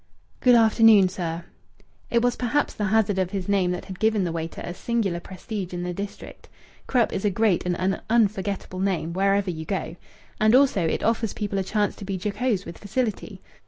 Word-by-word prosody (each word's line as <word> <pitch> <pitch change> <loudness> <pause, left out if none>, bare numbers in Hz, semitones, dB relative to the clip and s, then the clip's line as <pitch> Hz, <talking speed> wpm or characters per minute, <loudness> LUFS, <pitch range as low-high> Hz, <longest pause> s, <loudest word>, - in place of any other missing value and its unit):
"Good 250 -1 +5
afternoon, 220 -3 +6
sir." 170 -2 -4 0.6
It 235 0 +2
was 245 0 +2
perhaps 255 +4 0
the 210 - -2
hazard 205 -1 +2
of 185 -2 0
his 190 -2 -4
name 195 -3 +2
that 180 0 -3
had 190 -2 -9
given 220 -2 +2
the 175 - -1
waiter 165 0 -5
a 175 - -5
singular 200 -4 -1
prestige 190 +1 -6
in 175 - -3
the 180 0 -3
district. 200 +2 -8 0.4
Krupp 245 -3 +2
is 190 - -3
a 205 - +3
great 200 -3 +1
and 175 -1 0
an 190 +1 0
unforgettable 200 -4 0
name, 185 -4 -1
wherever 195 0 +1
you 160 -2 -6
go. 180 -1 -3 0.4
And 215 +2 +5
also 260 -9 +4
it - - -1
offers 225 -1 0
people 205 -2 -2
a - - 0
chance 205 +1 0
to - - -9
be 195 0 -3
jocose 210 +1 -1
with 170 - -9
facility. 215 +1 -3
200 Hz, 195 wpm, -24 LUFS, 180-220 Hz, 0.6 s, afternoon